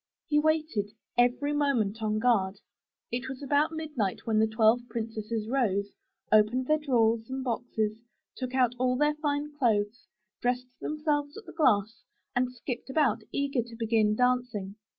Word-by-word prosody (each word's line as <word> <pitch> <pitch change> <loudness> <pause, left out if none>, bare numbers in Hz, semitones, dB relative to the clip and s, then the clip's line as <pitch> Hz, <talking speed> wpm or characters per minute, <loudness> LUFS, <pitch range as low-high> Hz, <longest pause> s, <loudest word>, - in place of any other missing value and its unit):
He 295 -1 +3
waited, 310 -9 +1 0.3
every 245 +4 +2
moment 240 -8 +1
on 215 -1 0
guard. 205 -4 +2 0.5
It 250 +2 -3
was 265 +1 -7
about 290 +3 +2
midnight 300 -11 -3
when 220 -1 +2
the 220 - +4
twelve 220 +2 +4
princesses 225 -1 -3
rose, 205 -6 0 0.4
opened 215 +4 +4
their 310 +3 +2
drawers 230 -5 +2
and 265 0 -3
boxes, 220 -3 -2 0.4
took 255 -1 -4
out 250 -2 +3
all 255 0 +2
their 295 +2 +3
fine 295 -1 -2
clothes, 215 -3 +1 0.3
dressed 250 +1 0
them 305 - -3
selves 290 -2 0
at 440 - -10
the - - -11
glass, 235 - +2 0.3
and 250 0 +1
skipped 250 +1 -6
about, 265 -4 +2
eager 280 -3 0
to 235 0 -10
begin 220 -2 +2
dancing. 245 -5 0
245 Hz, 155 wpm, -29 LUFS, 220-280 Hz, 0.5 s, the